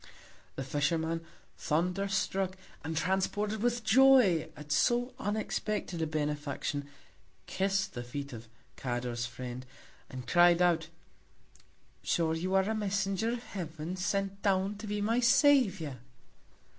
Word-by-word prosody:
The 135 - -3
Fisherman, 160 +4 -1 0.4
thunder 180 +5 0
struck, 190 -1 -1 0.3
and 160 +1 -3
transported 205 +4 0
with 240 0 0
Joy 245 -8 +5
at 150 0 -9
so 245 - +2
unexpected 210 -4 -2
a 160 - 0
Benefaction, 145 -2 -2 0.6
kiss'd 195 +1 -1
the 120 - -4
Feet 140 +3 -6
of 115 0 -9 0.3
Cador's 120 -1 -3
Friend, 125 +1 -7 0.5
and 130 -1 -7
cried 175 -1 +5
out, 170 -3 +2 1.1
sure 165 -2 +1
you 185 +4 -1
are 190 0 +3
a 220 - 0
Messenger 200 0 0
of 245 0 -5
Heaven, 165 -3 -5
sent 195 +1 -2
down 195 0 +1
to 215 - -7
be 205 0 -2
my 225 +4 +2
Saviour! 240 - +3
185 Hz, 125 wpm, -31 LUFS, 150-205 Hz, 1.1 s, Joy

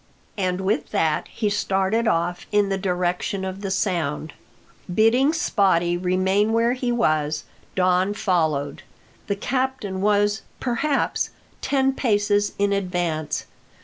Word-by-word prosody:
And 185 -2 -1
with 200 +4 0
that 160 -7 0
he 215 - -2
started 205 +2 +1
off 175 -2 0
in 205 -1 +3
the 195 - 0
direction 180 +1 -1
of 190 +1 -5
the 195 - -3
sound. 170 -6 -1 0.6
Bidding 230 - +4
Spottie 190 - +2
remain 190 +4 +1
where 230 +1 +3
he 250 -1 -2
was, 155 -9 +1 0.3
Don 185 +2 +2
followed. 160 -9 0 0.5
The 200 - 0
captain 255 -4 -2
was, 205 +1 +2 0.2
perhaps, 270 +4 0 0.3
ten 270 -1 +1
paces 205 -5 +1
in 200 0 +2
advance. 175 -6 -2
195 Hz, 120 wpm, -23 LUFS, 180-220 Hz, 0.6 s, Bidding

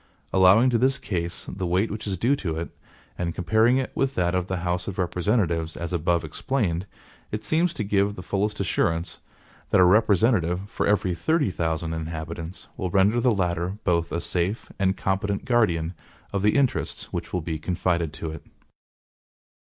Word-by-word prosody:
Allowing 95 +7 +6
to 115 - +2
this 135 +3 +3
case 85 -3 -3
the 90 -1 -4
weight 95 +5 +1
which 105 0 -5
is 95 -2 -2
due 125 +10 +2
to 80 -9 -3
it, 85 - -5 0.4
and 85 -2 -2
comparing 110 +7 +3
it 130 - -2
with 135 0 0
that 90 -1 +1
of 90 -1 0
the 95 - -2
House 90 0 -1
of 95 - -5
Representatives 85 -2 0
as 85 +1 -4
above 85 0 +1
explained 95 - -1 0.4
it 105 0 -3
seems 165 +2 +2
to 125 - -2
give 100 0 +1
the 90 - -8
fullest 100 +3 -1
assurance, 85 -3 0 0.5
that - - +4
a - - +8
representative 100 -2 +3
for - - -2
every 100 -3 +2
THIRTY 145 - +1
THOUSAND 80 0 -2
INHABITANTS 80 +2 -6
will 95 - -2
render 100 +6 +3
the 125 - +4
latter 90 -2 0
both 85 -2 +1
a 85 - -1
safe 90 +6 -2
and 95 0 +1
competent 100 +1 -1
guardian 90 -10 +2 0.4
of 100 - 0
the 105 +1 +3
interests 140 -3 0
which - - -4
will 90 - -1
be 80 -1 -4
confided 85 -1 0
to 80 0 -5
it. 80 - -9
90 Hz, 175 wpm, -25 LUFS, 85-105 Hz, 0.5 s, a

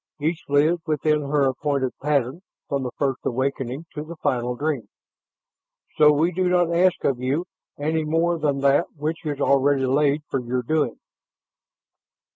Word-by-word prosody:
Each 160 +3 -1
lives 155 +4 +3
within 150 0 +1
her 145 0 +1
appointed 135 0 0
pattern 140 +1 0 0.3
from 140 -1 -1
the 130 - -3
First 135 -3 0
Awakening 130 +3 -2
to 150 - -5
the 165 +2 -9
Final 125 -5 -1
Dream. 145 -2 -2 1.1
So 150 -1 +6
we 155 +4 +2
do 180 +1 0
not 175 -2 +2
ask 180 +1 +2
of 130 -3 +1
you 135 +7 -1 0.3
any 155 +2 0
more 165 +2 +1
than 145 -2 0
that 140 +4 +3
which 155 +3 -3
is 145 -2 -3
already 140 -1 +3
laid 145 +2 +2
for 135 - -1
your 125 0 -2
doing." 145 -2 0
145 Hz, 155 wpm, -23 LUFS, 135-160 Hz, 1.1 s, So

